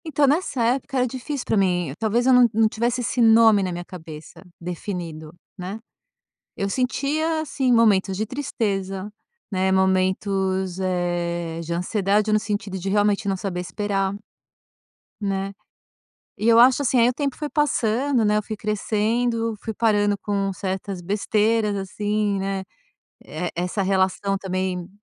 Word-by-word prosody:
Então 295 Hz, -2 st, +2 dB
nessa 280 Hz, -3 st, +1 dB
época 260 Hz, +3 st, 0 dB
era 250 Hz, -, +3 dB
difícil 260 Hz, +2 st, -5 dB
para -, -, 0 dB
mim, 180 Hz, -6 st, +1 dB
talvez 230 Hz, +2 st, +1 dB
eu 260 Hz, -, +5 dB
não 250 Hz, -1 st, +7 dB
não 220 Hz, +1 st, +4 dB
tivesse 235 Hz, +3 st, -1 dB
esse 245 Hz, +1 st, -1 dB
nome 225 Hz, -2 st, +6 dB
na 185 Hz, -1 st, -1 dB
minha 175 Hz, 0 st, -5 dB
cabeça 160 Hz, -4 st, -10 dB, 0.2 s
definido, 170 Hz, -3 st, -6 dB, 0.3 s
né. 185 Hz, +4 st, -6 dB, 0.8 s
Eu 195 Hz, -, -2 dB
sentia, 295 Hz, +7 st, 0 dB
assim, 270 Hz, -4 st, 0 dB
momentos 205 Hz, -5 st, +3 dB
de 215 Hz, -, -1 dB
tristeza, 205 Hz, -6 st, -3 dB, 0.4 s
né, 190 Hz, 0 st, +1 dB
momentos, 190 Hz, 0 st, +1 dB
eh, 175 Hz, -2 st, -2 dB
de 170 Hz, +1 st, -4 dB
ansiedade 200 Hz, +4 st, +1 dB
no 215 Hz, -, +4 dB
sentido 205 Hz, -2 st, -3 dB
de 195 Hz, +2 st, -3 dB
realmente 205 Hz, +1 st, +2 dB
não 195 Hz, -, +1 dB
saber 185 Hz, -1 st, -4 dB
esperar, 195 Hz, +2 st, -1 dB, 1.1 s
né. 195 Hz, -1 st, -2 dB, 0.8 s
E 215 Hz, -, -2 dB
eu 230 Hz, 0 st, +6 dB
acho, 255 Hz, +3 st, +6 dB
assim, 255 Hz, -2 st, +2 dB
aí 235 Hz, -, +5 dB
o -, -, +1 dB
tempo 280 Hz, -1 st, -2 dB
foi 300 Hz, -, -4 dB
passando 260 Hz, -3 st, +1 dB
né, 210 Hz, 0 st, +3 dB
eu 210 Hz, -, +1 dB
fui 215 Hz, +1 st, -6 dB
crescendo, 225 Hz, +2 st, 0 dB
fui 225 Hz, -, -2 dB
parando 205 Hz, -2 st, +2 dB
com 200 Hz, -1 st, -1 dB
certas 190 Hz, 0 st, -4 dB
besteiras, 210 Hz, +3 st, +1 dB
assim, 205 Hz, +1 st, -1 dB
né, 195 Hz, 0 st, -2 dB, 0.6 s
e 170 Hz, +3 st, -4 dB
essa 180 Hz, +3 st, -1 dB
relação 195 Hz, +1 st, +1 dB
também, 185 Hz, -2 st, -3 dB
205 Hz, 150 wpm, -23 LUFS, 190-230 Hz, 1.1 s, não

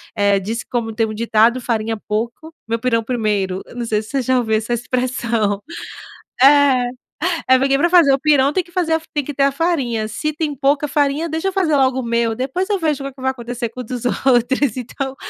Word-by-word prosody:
eh, 200 Hz, -2 st, +3 dB
disse 220 Hz, +5 st, -4 dB
como 230 Hz, -2 st, -3 dB
tem 225 Hz, -, +2 dB
um 215 Hz, -, -5 dB
ditado: 230 Hz, +2 st, +2 dB
"Farinha 225 Hz, -2 st, -2 dB
pouco, 235 Hz, +9 st, -3 dB
meu 230 Hz, +1 st, -1 dB
pirão 230 Hz, -1 st, +1 dB
primeiro", 210 Hz, -6 st, -1 dB
eu -, -, -15 dB
não 240 Hz, -1 st, -3 dB
sei 215 Hz, -2 st, 0 dB
se 215 Hz, -, -13 dB
você 275 Hz, -1 st, 0 dB
já 255 Hz, +1 st, +1 dB
ouviu 220 Hz, -3 st, +1 dB
essa 220 Hz, +2 st, -1 dB
expressão. 235 Hz, -4 st, -1 dB, 0.8 s
É, 275 Hz, -3 st, +5 dB, 0.6 s
é 260 Hz, 0 st, +6 dB
porque 275 Hz, +1 st, +2 dB
pra 345 Hz, +4 st, +2 dB
fazer 335 Hz, -6 st, +6 dB
o 270 Hz, -, +3 dB
pirão 280 Hz, -1 st, +3 dB
tem 365 Hz, +3 st, 0 dB
que 345 Hz, -, -20 dB
fazer 345 Hz, -2 st, 0 dB
a 320 Hz, -, +1 dB
fa 320 Hz, -, -19 dB
tem 290 Hz, -2 st, 0 dB
que 290 Hz, -, -6 dB
ter 275 Hz, -, +2 dB
a 275 Hz, -, +2 dB
farinha, 275 Hz, -8 st, -1 dB
se 305 Hz, +8 st, -3 dB
tem 300 Hz, -1 st, -2 dB
pouca 280 Hz, +2 st, +1 dB
farinha: 290 Hz, +3 st, 0 dB
"Deixa 320 Hz, +4 st, -2 dB
eu -, -, -2 dB
fazer 355 Hz, -6 st, +1 dB
logo 260 Hz, -1 st, +2 dB
o -, -, -4 dB
meu, 235 Hz, -1 st, 0 dB
depois 270 Hz, -, -2 dB
eu 405 Hz, -, +2 dB
vejo 305 Hz, -5 st, -1 dB
o -, -, -3 dB
que 275 Hz, -, -7 dB
que 260 Hz, -, -13 dB
vai 265 Hz, -, +1 dB
acontecer 240 Hz, -1 st, -5 dB
com 250 Hz, -, -9 dB
o -, -, -5 dB
dos 245 Hz, +1 st, -6 dB
outros". 255 Hz, 0 st, +1 dB
Então, 265 Hz, +2 st, -5 dB
255 Hz, 235 wpm, -19 LUFS, 230-285 Hz, 0.8 s, é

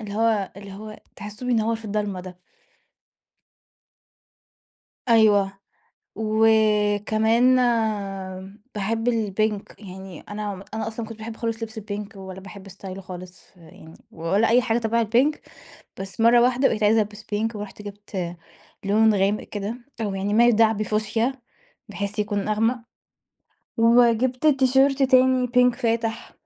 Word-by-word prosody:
اللي 205 Hz, -2 st, -7 dB
هو 220 Hz, -3 st, +1 dB
اللي 200 Hz, -1 st, -10 dB
هو 215 Hz, +2 st, -9 dB, 0.2 s
تحسّه 210 Hz, +4 st, -8 dB
بينور 230 Hz, -2 st, +1 dB
في 225 Hz, -, -14 dB
الضلمة 205 Hz, -2 st, -2 dB
ده. 180 Hz, 0 st, -11 dB, 2.7 s
أيوه 205 Hz, -4 st, +4 dB, 0.6 s
وكمان 220 Hz, +2 st, +3 dB, 1.2 s
باحب 225 Hz, +4 st, -1 dB
الpink 215 Hz, -2 st, -1 dB
يعني 190 Hz, -3 st, -10 dB
أنا 205 Hz, -2 st, -6 dB
أنا 220 Hz, -, -3 dB
أصلًا 225 Hz, +1 st, -5 dB
ما 220 Hz, -, -8 dB
كنتش 225 Hz, -, -9 dB
باحب 220 Hz, 0 st, -7 dB
خالص 230 Hz, -1 st, -3 dB
لبس 220 Hz, 0 st, -6 dB
الpink 205 Hz, -1 st, -7 dB
ولا 190 Hz, -1 st, -8 dB
باحب 195 Hz, 0 st, -11 dB
ستايله 195 Hz, 0 st, -9 dB
خالص 185 Hz, 0 st, -11 dB
يعني 160 Hz, -1 st, -15 dB, 0.2 s
ولا 190 Hz, +8 st, +1 dB
أي 245 Hz, +2 st, +5 dB
حاجة 230 Hz, -1 st, 0 dB
تبع 230 Hz, 0 st, +1 dB
الpink 250 Hz, +8 st, +2 dB, 0.6 s
بس 195 Hz, +3 st, -6 dB
مرة 235 Hz, +1 st, +6 dB
واحدة 255 Hz, +2 st, +3 dB
بقيت 215 Hz, -, -1 dB
عايزة 220 Hz, +1 st, +4 dB
ألبس 210 Hz, 0 st, -6 dB
pink 220 Hz, +2 st, -2 dB
ورُحت 210 Hz, 0 st, -8 dB
جِبت 200 Hz, -4 st, -6 dB, 0.5 s
لون 215 Hz, +1 st, +4 dB
غامق 200 Hz, +2 st, +1 dB
كده 210 Hz, +3 st, -5 dB, 0.2 s
أو 205 Hz, -3 st, -2 dB
يعني 200 Hz, +2 st, -2 dB
ما 235 Hz, +2 st, +5 dB
يدعى 225 Hz, -1 st, +4 dB
بفوشيا 215 Hz, +4 st, -1 dB, 0.6 s
بحيث 200 Hz, 0 st, -4 dB
يكون 205 Hz, -1 st, -1 dB
أغمق 225 Hz, +4 st, +1 dB, 1.0 s
وجِبت 240 Hz, +3 st, +3 dB
تيشيرت 270 Hz, 0 st, +3 dB
تاني 255 Hz, -1 st, +4 dB
pink 250 Hz, 0 st, +4 dB
فاتح 230 Hz, -2 st, -2 dB
215 Hz, 130 wpm, -23 LUFS, 200-230 Hz, 2.7 s, مرة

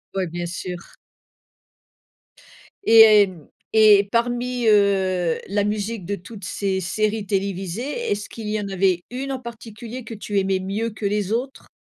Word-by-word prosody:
Ouais, 185 Hz, -2 st, 0 dB
bien 175 Hz, +1 st, -5 dB
sûr. 180 Hz, 0 st, -5 dB, 2.1 s
Et 225 Hz, 0 st, +7 dB
et 215 Hz, -2 st, +8 dB
hem 180 Hz, -6 st, -7 dB, 0.2 s
et 210 Hz, -2 st, +6 dB
parmi, 245 Hz, +1 st, 0 dB
heu, 190 Hz, -5 st, +3 dB
la 205 Hz, +1 st, 0 dB
musique 210 Hz, 0 st, -2 dB
de 200 Hz, +2 st, -2 dB
toutes 200 Hz, +2 st, -12 dB
ces 190 Hz, 0 st, -2 dB
séries 215 Hz, +3 st, -1 dB
télévisées, 200 Hz, -, -3 dB
est-ce 205 Hz, 0 st, -2 dB
qu'il 220 Hz, -2 st, -7 dB
y 215 Hz, 0 st, -1 dB
en 200 Hz, -, -4 dB
avait 185 Hz, -2 st, +1 dB
une 270 Hz, +2 st, -4 dB
en 265 Hz, -, -3 dB
particulier 235 Hz, 0 st, -9 dB
que 225 Hz, -, -8 dB
tu 205 Hz, -1 st, -2 dB
aimais 190 Hz, 0 st, 0 dB
mieux 205 Hz, +5 st, -2 dB
que 215 Hz, -1 st, -7 dB
les 205 Hz, 0 st, -1 dB
autres? 255 Hz, +4 st, -3 dB
205 Hz, 155 wpm, -22 LUFS, 190-225 Hz, 2.1 s, et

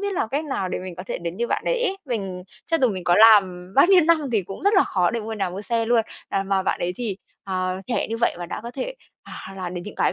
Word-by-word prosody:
biết 405 Hz, 0 st, -2 dB
làm 230 Hz, -, -1 dB
cách 290 Hz, +5 st, -2 dB
nào 230 Hz, -11 st, -2 dB
để -, -, -3 dB
mình 185 Hz, -1 st, -7 dB
có 180 Hz, -, -6 dB
thể -, -, -3 dB
đến 170 Hz, +1 st, -5 dB
như 235 Hz, +1 st, -1 dB
bạn -, -, -1 dB
đấy -, -, 0 dB
ấy. 390 Hz, -3 st, 0 dB
Mình 195 Hz, -8 st, -4 dB, 0.2 s
cho 330 Hz, -, +2 dB
dù 255 Hz, -, +4 dB
mình 185 Hz, -4 st, -4 dB
có 175 Hz, -, +4 dB
làm 190 Hz, -4 st, +5 dB
bao 275 Hz, -, +7 dB
nhiêu 380 Hz, -1 st, +7 dB
năm 335 Hz, 0 st, +4 dB
thì 210 Hz, -4 st, +2 dB
cũng 195 Hz, -, -9 dB
rất 405 Hz, +2 st, +3 dB
là 385 Hz, -, +6 dB
khó 180 Hz, -3 st, +1 dB
để 230 Hz, 0 st, -2 dB
mua 220 Hz, +1 st, -5 dB
nhà 200 Hz, -4 st, -2 dB
mua 195 Hz, +3 st, -6 dB
xe 230 Hz, 0 st, 0 dB
luôn, 235 Hz, -1 st, +3 dB, 0.3 s
à, 195 Hz, -, 0 dB
mà 195 Hz, -1 st, 0 dB
bạn -, -, 0 dB
ấy 175 Hz, +1 st, -1 dB
thì, 220 Hz, -6 st, -3 dB, 0.3 s
à, 185 Hz, -1 st, -2 dB
trẻ 245 Hz, -, -1 dB
như 225 Hz, -, -2 dB
vậy 235 Hz, -, +1 dB
mà 175 Hz, -, -5 dB
đã -, -, -5 dB
có 235 Hz, -, -6 dB
thể, 275 Hz, -, -5 dB, 0.3 s
à, -, -, -13 dB, 0.2 s
làm 180 Hz, -1 st, -5 dB
đến 175 Hz, -, -4 dB
những 210 Hz, -, -8 dB
cái -, -, +1 dB
210 Hz, 300 wpm, -23 LUFS, 185-250 Hz, 0.3 s, bao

